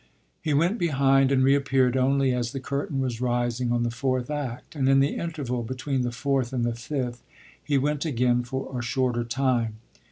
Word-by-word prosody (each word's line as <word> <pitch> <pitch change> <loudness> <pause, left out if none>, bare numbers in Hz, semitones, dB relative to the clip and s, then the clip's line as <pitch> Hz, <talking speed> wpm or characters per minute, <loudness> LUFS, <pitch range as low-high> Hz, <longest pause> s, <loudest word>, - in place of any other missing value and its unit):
He 155 - -1
went 175 +10 +2
behind 135 -4 +3
and 130 -1 +3
reappeared 135 -2 +3
only 135 0 +2
as 120 0 -2
the 135 - -3
curtain 140 0 -2
was 125 -3 -2
rising 120 0 0
on 120 0 +1
the 120 - -1
fourth 130 +2 -1
act; 145 -2 -5
and 135 -2 +1
in 135 0 +5
the 140 +2 +2
interval 145 -8 -3
between 130 +3 -2
the 120 -1 -1
fourth 135 0 -1
and 120 -2 0
the 120 - 0
fifth 120 0 -4 0.4
he 145 -2 +1
went 145 +1 0
again 125 -4 +2
for 130 +2 -5
a 125 - -2
shorter 120 0 0
time. 120 -2 0
130 Hz, 190 wpm, -26 LUFS, 120-140 Hz, 0.4 s, in